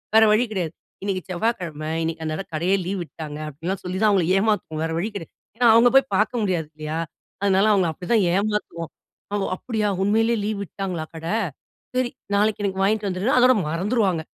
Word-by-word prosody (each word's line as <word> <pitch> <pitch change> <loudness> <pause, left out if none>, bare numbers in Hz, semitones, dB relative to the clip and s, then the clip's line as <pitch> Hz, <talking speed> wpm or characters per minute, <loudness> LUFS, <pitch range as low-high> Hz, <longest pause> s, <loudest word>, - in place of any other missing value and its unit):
வேற 220 - +8
வழி 215 +3 +4
கிடையாது. 175 -6 -2 0.3
"இன்னிக்கு 195 -2 -1
செவ்வாக்கிழமை. 175 -6 -2
இன்னைக்கு 160 0 -3
அந்த 155 0 -2
இடம் 195 - -7
கடையே 175 +5 +2
லீவ் 190 +1 -2
விட்டாங்க." 155 -2 -8
அப்படின்லாம் 170 +7 -4
சொல்லி 185 +1 -3
தான் 215 - +6
அவுங்களை 185 -5 +2
ஏமாத்துவோம். 205 -7 0
வேற 165 - -3
வழி 210 +6 -1
கிடையாது. 165 -5 -7 0.2
ஏன்னா 245 - +4
அவுங்க 230 +2 +7
போய் 270 0 +3
பார்க்க 230 +2 +1
முடியாது 175 -6 0
இல்லையா? 155 +1 -4 0.4
அதனால 195 0 +3
அவுங்கள 185 -4 +3
அப்படி 180 +5 -9
தான் 220 -4 +4
ஏமாத்துவோம். 200 -5 -2 0.4
அவுங்க 205 -1 0
"அப்டியா 220 -4 -1
உண்மையிலேயே 225 +3 +2
லீவ் 210 -1 -2
விட்டாங்களா 185 -4 -4
கடை? 165 +6 -2 0.6
சரி 255 -1 +1 0.3
நாளைக்கு 210 0 +2
எனக்கு 190 -1 -1
வாங்கிட்டு 210 0 +1
வந்துருன்னா" 190 +9 0
அதோட 250 +1 +6 0.2
மறந்துருவாங்க. 190 0 +1
195 Hz, 180 wpm, -23 LUFS, 165-215 Hz, 0.6 s, வேற